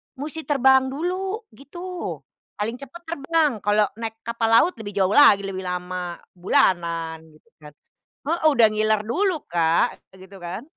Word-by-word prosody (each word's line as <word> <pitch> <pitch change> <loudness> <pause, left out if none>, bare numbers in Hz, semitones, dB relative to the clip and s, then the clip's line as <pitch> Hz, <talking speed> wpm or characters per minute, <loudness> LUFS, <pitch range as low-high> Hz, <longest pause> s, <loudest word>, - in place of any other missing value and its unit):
musti 305 +3 -5
terbang 265 -2 +4
dulu, 370 - -3
gitu. 350 +6 -7 0.3
Paling 225 +4 -3
cepat 275 +6 -10
terbang, 320 -1 0
kalau 210 +2 +2 0.2
naik 225 -1 -4
kapal 230 0 -1
laut 230 +11 +5
lebih 205 -2 -7
jauh 190 -1 +2
lagi 210 -7 +6
lebih 195 -1 -5
lama. 180 -1 -4 0.2
Bulanan, 170 -2 0 0.2
gitu 230 +9 -26
kan. 150 -1 -14 0.5
Heeh, 335 +2 0
udah 235 -5 +5
ngiler 215 0 +1
dulu, 360 - 0
Kak. 165 -1 +2 0.3
Gitu 190 +1 -14
kan. 180 +6 -6
225 Hz, 145 wpm, -23 LUFS, 185-295 Hz, 0.5 s, lagi